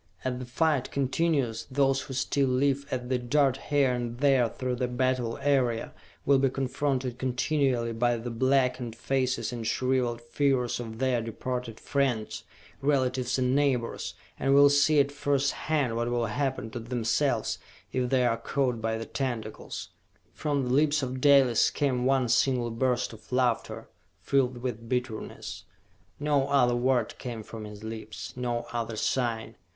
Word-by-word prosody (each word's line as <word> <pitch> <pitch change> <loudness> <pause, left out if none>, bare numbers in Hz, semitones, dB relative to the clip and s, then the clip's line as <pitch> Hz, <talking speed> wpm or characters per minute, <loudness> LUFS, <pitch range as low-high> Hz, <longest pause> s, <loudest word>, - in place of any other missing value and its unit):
As 125 -1 -2
the 125 - -5
fight 145 +1 +1
continues, 135 -4 0
those 135 0 +2
who 130 - -7
still 140 +1 +1
live, 140 +2 +1
as 130 - -2
they 125 0 0
dart 135 +2 +2
here 140 -3 +3
and 120 -1 -3
there 135 -3 +3
through 125 +2 -3
the 125 0 0
battle 125 -1 0
area, 130 -5 +1 0.3
will 140 -1 +5
be 135 0 +3
confronted 130 -1 -2
continually 130 -2 0
by 120 +1 +1
the 120 +1 -5
blackened 125 -1 +1
faces 130 -2 -1
and 115 -2 -4
shriveled 125 -1 0
figures 125 +1 0
of 110 -2 -6
their 130 -1 +1
departed 115 +1 -4
friends, 130 -6 -1 0.4
relatives 130 -3 +1
and 130 0 +1
neighbors, 135 -5 0 0.2
and 135 0 +3
will 140 0 +7
see 145 +1 +4
at 140 0 +3
first 140 -1 +1
hand 145 -7 -1
what 120 +1 -1
will 120 -1 0
happen 130 0 -2
to 120 - -5
themselves 115 +1 0 0.3
if 125 -1 0
they 130 -1 +3
are 115 -1 +2
caught 125 0 -1
by 110 0 -1
the 115 - -5
tentacles!" 120 -6 -4 0.4
From 145 -3 -1
the 125 0 -1
lips 150 +1 +3
of 130 0 -4
Dalis 135 -5 +5
came 130 -3 0
one 135 -2 +3
single 120 0 +2
burst 125 +1 0
of 110 - -15
laughter, 125 -3 0 0.3
filled 125 -3 0
with 115 -2 -4
bitterness. 125 -3 -4 0.5
No 145 -2 +2
other 130 -4 +3
word 125 -1 +1
came 115 -3 -5
from 110 0 -8
his 105 0 -10
lips, 110 -1 -7
no 120 -1 -2
other 115 -1 -2
sign. 115 0 -1
125 Hz, 155 wpm, -28 LUFS, 120-135 Hz, 0.5 s, will